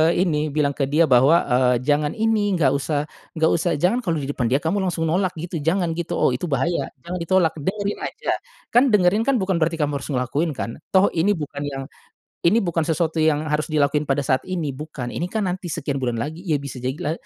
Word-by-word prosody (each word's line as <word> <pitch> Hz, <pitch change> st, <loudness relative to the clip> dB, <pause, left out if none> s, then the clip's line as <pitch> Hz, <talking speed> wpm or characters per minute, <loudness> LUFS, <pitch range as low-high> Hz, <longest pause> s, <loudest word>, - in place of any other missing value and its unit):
ini, 155 Hz, -4 st, +1 dB
bilang 145 Hz, -1 st, +1 dB
ke 135 Hz, -1 st, -1 dB
dia 155 Hz, +4 st, +3 dB
bahwa, 135 Hz, +4 st, +5 dB
eee, 125 Hz, -1 st, +3 dB
"Jangan 145 Hz, +1 st, +1 dB
ini, 215 Hz, -3 st, +1 dB
nggak 140 Hz, -6 st, +3 dB
usah 145 Hz, +1 st, 0 dB, 0.3 s
nggak 160 Hz, 0 st, +3 dB
usah, 170 Hz, +1 st, +1 dB
jangan 180 Hz, -, +2 dB
kalo 175 Hz, -9 st, -1 dB
di 135 Hz, -, -4 dB
depan 125 Hz, -4 st, -1 dB
dia 130 Hz, +4 st, +2 dB
kamu 185 Hz, +5 st, 0 dB
langsung 175 Hz, -3 st, -1 dB
nolak 185 Hz, 0 st, 0 dB
gitu 165 Hz, +1 st, -5 dB
jangan.", 165 Hz, +3 st, 0 dB
gitu. 170 Hz, +1 st, -3 dB
Oh, -, -, +3 dB
itu 125 Hz, +8 st, -2 dB
bahaya, 165 Hz, +4 st, 0 dB, 0.2 s
jangan 180 Hz, +1 st, -4 dB
ditolak, 170 Hz, -1 st, +2 dB
dengerin 200 Hz, +6 st, -2 dB
aja, -, -, -3 dB, 0.4 s
kan 245 Hz, +3 st, +6 dB
dengerin 205 Hz, +1 st, +4 dB
kan 275 Hz, -, +3 dB
bukan 190 Hz, -2 st, 0 dB
berarti 165 Hz, +1 st, +1 dB
kamu 145 Hz, -2 st, 0 dB
harus -, -, -8 dB
ngelakuin 140 Hz, +6 st, 0 dB
kan, 115 Hz, +1 st, -5 dB, 0.2 s
toh 190 Hz, +2 st, +5 dB
ini 190 Hz, +5 st, +2 dB
bukan 150 Hz, -2 st, -6 dB
yang, 135 Hz, -1 st, -4 dB, 0.6 s
ini 185 Hz, +7 st, +5 dB
bukan 170 Hz, -1 st, 0 dB
sesuatu 160 Hz, -1 st, 0 dB
yang 155 Hz, -1 st, +2 dB
harus 150 Hz, +1 st, -1 dB
dilakuin 150 Hz, 0 st, +1 dB
pada 140 Hz, 0 st, +1 dB
saat 130 Hz, 0 st, +2 dB
ini, 165 Hz, -6 st, -2 dB
bukan. 135 Hz, -3 st, -6 dB
Ini 170 Hz, -, -2 dB
kan 215 Hz, +1 st, -1 dB
nanti 180 Hz, -1 st, -3 dB
sekian 140 Hz, -3 st, -3 dB
bulan 120 Hz, -2 st, -1 dB
lagi 155 Hz, +6 st, -5 dB
ya, 155 Hz, -5 st, +1 dB
bisa 140 Hz, -3 st, -7 dB
jadi 130 Hz, +3 st, -2 dB
la 150 Hz, -, -2 dB
160 Hz, 220 wpm, -22 LUFS, 140-180 Hz, 0.6 s, kan